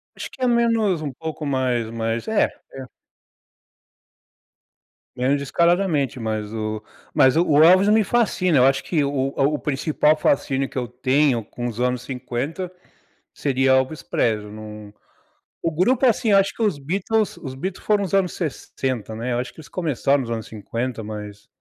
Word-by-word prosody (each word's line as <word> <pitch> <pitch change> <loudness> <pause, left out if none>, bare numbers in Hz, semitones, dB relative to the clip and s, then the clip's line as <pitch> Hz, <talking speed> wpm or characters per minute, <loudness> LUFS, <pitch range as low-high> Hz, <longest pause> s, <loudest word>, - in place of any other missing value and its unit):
Eu - - -20
acho - - -6
que - - -15
é 255 - +3
menos 230 -7 +2
um 145 -3 -3
pouco 155 +2 -6
mais 130 -4 0
mais 115 0 -3
é, 220 -1 +3 0.3
é. 135 -1 -7 2.3
Menos 130 +3 +1
descaradamente, 155 -2 +1
mas 110 -2 -3
o 110 -1 -3 0.3
mas 130 +2 +5
o 170 - +4
o 150 0 +5
Elvis 185 +4 +6
me 215 +1 +5
fascina, 185 - +2
eu 125 - +6
acho 135 0 +2
que 155 -4 0
o 140 - 0 0.3
o 140 +2 +2
o - - -4
principal 150 +1 +1
fascínio 135 -3 0
que - - -9
eu 125 -2 -1
tenho 130 0 +1
com 120 +3 -6
os 120 -1 -6
anos 125 0 0
50, 135 +8 -4 0.6
seria 130 -1 +1
Elvis 130 +4 +1
Presley 105 -2 -1
num 105 -1 -9 0.7
o 165 - -1
grupo, 250 - +3
assim, 225 -2 +2
acho 195 0 +4
que 230 - -4
os 205 -9 +1
Beatles 195 +8 -1
os 135 -3 -7
Beatles 180 +8 -5
foram 205 -1 +2
os 190 - -4
anos 190 -2 +2
60, 130 - -4
né, 120 +2 -3
eu 120 - 0
acho 125 - -4
que - - -28
eles 150 - -13
começaram 145 -5 0
nos 120 - -5
anos 115 -2 -3
50, 115 +3 -4
mas 105 -1 -8
135 Hz, 175 wpm, -22 LUFS, 120-175 Hz, 2.3 s, Elvis